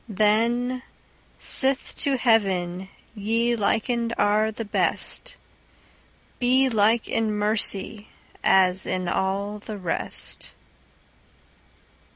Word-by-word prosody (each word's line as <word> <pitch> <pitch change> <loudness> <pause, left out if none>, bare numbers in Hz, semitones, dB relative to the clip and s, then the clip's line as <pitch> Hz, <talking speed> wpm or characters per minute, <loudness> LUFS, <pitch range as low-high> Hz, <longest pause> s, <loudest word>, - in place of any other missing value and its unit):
Then, 230 +5 +1 0.6
sith 265 0 +2
to 275 -2 0
heaven 190 -6 +1 0.2
ye 230 +3 0
likened 230 +2 -1
are 210 +1 +2
the 225 +1 -6
best, 205 - -1 1.0
Be 260 +2 +3
like 220 0 +2
in 225 -1 0
mercy 210 0 +1 0.4
as 185 0 +3
in 185 -1 -2
all 200 +3 -2
the 210 0 -8
rest. 180 -4 -4
215 Hz, 90 wpm, -24 LUFS, 200-235 Hz, 1.0 s, Be